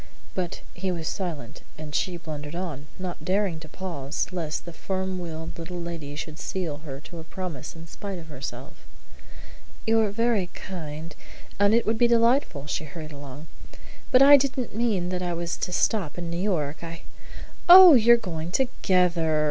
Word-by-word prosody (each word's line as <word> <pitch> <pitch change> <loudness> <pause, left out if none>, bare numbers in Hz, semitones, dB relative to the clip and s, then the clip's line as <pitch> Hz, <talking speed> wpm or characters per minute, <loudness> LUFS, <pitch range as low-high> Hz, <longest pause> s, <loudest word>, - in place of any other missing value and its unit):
But 180 -2 -3
he 185 +1 -2
was 165 -3 -4
silent, 160 - -4 0.2
and 150 -1 -8
she 180 +3 0
blundered 150 -2 -7
on, 160 -6 -5
not 185 -2 -5
daring 190 -3 0
to 155 -1 -12
pause 160 -6 -3
lest 165 -4 -3
the 170 - -8
firm 190 +1 -3
willed 165 -1 -6
little 175 +2 -6
lady 165 -4 -6
should 155 +1 -6
seal 170 -6 -3
her 145 -3 -8
to 170 +1 -10
a - - -8
promise 165 -5 -6
in 165 0 -10
spite 195 +3 -6
of 170 - -9
herself. 135 -3 -7 1.1
"You're 225 -1 +3
very 220 -2 +1
kind, 160 -3 -7 0.4
and 205 +2 +5
it 235 - +2
would 220 0 0
be 240 - +6
delightful," 235 - +2
she 150 +1 -3
hurried 155 +1 -8
along, 145 0 -9 0.7
"but 255 +1 +7
I 285 +1 +10
didn't 260 -3 -2
mean 210 -6 0
that 180 0 -2
I 175 -1 -1
was 170 0 -2
to 180 - -3
stop 180 -3 0
in 170 -1 -4
New 170 +1 -2
York. 160 -6 -1
I 165 0 -7 0.3
" - - -15
"Oh, 365 -1 +12
you 235 -2 +7
are - - 0
going 170 -7 -5
together!" 180 - +2
175 Hz, 180 wpm, -26 LUFS, 155-195 Hz, 1.1 s, Oh